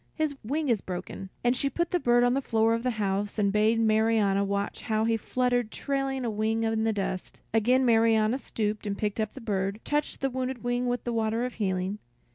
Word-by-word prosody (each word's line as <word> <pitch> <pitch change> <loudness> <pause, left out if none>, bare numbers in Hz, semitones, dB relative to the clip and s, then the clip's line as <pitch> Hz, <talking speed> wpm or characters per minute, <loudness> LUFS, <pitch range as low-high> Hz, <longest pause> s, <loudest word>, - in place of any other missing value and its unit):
His 310 -3 -1
wing 295 +7 -1
is 225 -5 +2
broken." 185 +1 -6
And 245 +1 +3
she 275 - +1
put 340 +5 -2
the 355 - +2
bird 240 -4 +3
on 245 0 +3
the 275 - +1
floor 225 -3 +2
of 230 - 0
the 250 - 0
house 200 0 -1
and 200 -2 +2
bade 215 +2 +3
Marianna 220 -3 +3
watch 200 0 -2
how 220 0 0
he 230 0 +2
fluttered 245 0 0
trailing 270 0 -2
a - - 0
wing 220 +2 0
in 225 0 0
the 225 - +2
dust. 195 -3 -4
Again 250 +4 +3
Marianna 225 +1 +3
stooped, 215 -4 -3
and 200 0 -2
picking 210 +1 -1
up 215 - -3
the 265 - -8
bird, 200 -2 -2
touched 295 0 -2
the 270 -1 0
wounded 255 -1 -3
wing 245 +1 0
with 245 -1 -1
the 240 - -2
water 225 +1 0
of 250 - -4
healing. 190 -1 -2
225 Hz, 220 wpm, -28 LUFS, 210-250 Hz, -, And